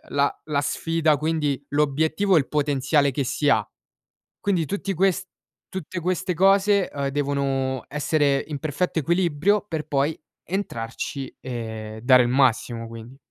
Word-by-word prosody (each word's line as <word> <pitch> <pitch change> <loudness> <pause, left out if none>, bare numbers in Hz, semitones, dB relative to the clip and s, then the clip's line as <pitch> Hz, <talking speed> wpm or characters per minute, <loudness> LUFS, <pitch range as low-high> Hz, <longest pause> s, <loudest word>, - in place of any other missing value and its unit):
la 140 0 +1
la 145 -2 0
sfida, 165 +1 +1
quindi 150 -2 -1
l'obiettivo 155 +7 +2
e 160 - +7
il 135 - -2
potenziale 145 -1 +2
che 140 - -1
si 145 +3 0
ha. 110 -6 +4 0.8
Quindi 180 -6 +1
tutti 195 +3 -3
ques 190 +1 +1 0.4
tutte 185 -1 -5
queste 180 +1 -1
cose, 195 +1 +4
uhm, 140 -1 -2
devono 135 -2 -1
essere 145 -1 +1
in 145 -2 -4
perfetto 155 +4 -1
equilibrio 175 +4 +2
per 160 -5 -4
poi 145 +3 0 0.3
entrarci 135 - -4
e 110 -3 -6
dare 130 0 +6
il 120 - 0
massimo, 120 -2 +1
quindi. 115 +3 -10
145 Hz, 140 wpm, -24 LUFS, 135-170 Hz, 0.8 s, e